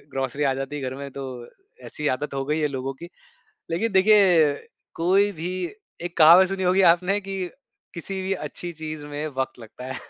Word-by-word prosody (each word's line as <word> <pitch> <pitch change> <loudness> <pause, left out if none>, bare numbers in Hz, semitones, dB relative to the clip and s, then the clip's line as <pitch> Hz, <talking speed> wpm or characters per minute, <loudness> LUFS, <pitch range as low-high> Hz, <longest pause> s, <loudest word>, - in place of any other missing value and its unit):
Grocery 135 +2 -2
आ 135 -1 +2
जाती 135 +2 -5
है 145 - -5
घर - - -6
में, 140 +1 -7
तो 135 0 -6 0.6
ऐसी 150 -1 -2
आदत 145 +1 -6
हो 135 0 -2
गयी 150 +3 -1
है 150 - +2
लोगों 130 +1 -3
की। 170 - -7 0.6
लेकिन 210 +7 -1
देखिए 190 -6 +5 0.4
कोई 190 +5 +3
भी 175 +2 -2 0.5
एक 175 0 -6
कहावत 175 +4 +8
सुनी 195 -1 -3
होगी 185 +2 +3
आपने 190 +4 -1
कि 195 0 -6 0.6
किसी 190 +3 -5
भी 190 +1 -2
अच्छी 175 -1 -6
चीज़ 155 -2 -7
में 145 +1 -5
वक़्त 130 -1 -2
लगता 115 +2 -11
है। - - -5
160 Hz, 190 wpm, -24 LUFS, 140-190 Hz, 0.6 s, कहावत